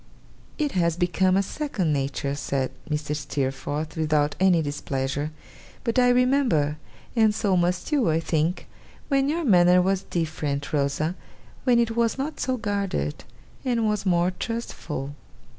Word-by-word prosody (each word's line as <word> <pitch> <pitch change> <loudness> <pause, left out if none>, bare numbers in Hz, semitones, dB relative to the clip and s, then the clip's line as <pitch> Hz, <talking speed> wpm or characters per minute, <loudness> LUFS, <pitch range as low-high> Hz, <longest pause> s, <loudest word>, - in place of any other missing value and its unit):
'It 295 -2 0
has 170 -3 +1
become 185 +1 +2
a 195 - +3
second 200 - -1
nature,' 140 0 -1
said 140 -2 -2 0.2
Mrs. 150 0 -2
Steerforth, 145 +2 -3
without 150 -2 +1
any 185 -2 +5
displeasure; 145 0 -2 0.5
'but 235 -1 +1
I 245 0 +5
remember, 245 - +3 0.4
and 220 -2 +4
so 195 -3 +1
must 180 - 0
you, 275 - +3
I 160 +1 +2
think, 165 +2 -1 0.4
when 275 -1 +2
your 335 +3 0
manner 180 -5 +6
was 190 +1 +2
different, 155 -6 -3
Rosa; 150 +3 0 0.5
when 250 -2 +5
it 230 -1 +1
was 235 0 +1
not 290 +3 -3
so 260 -1 0
guarded, 200 - -2 0.4
and 235 -4 +1
was 210 -1 0
more 175 -1 +2
trustful. 170 - -5
180 Hz, 140 wpm, -25 LUFS, 150-230 Hz, 0.5 s, manner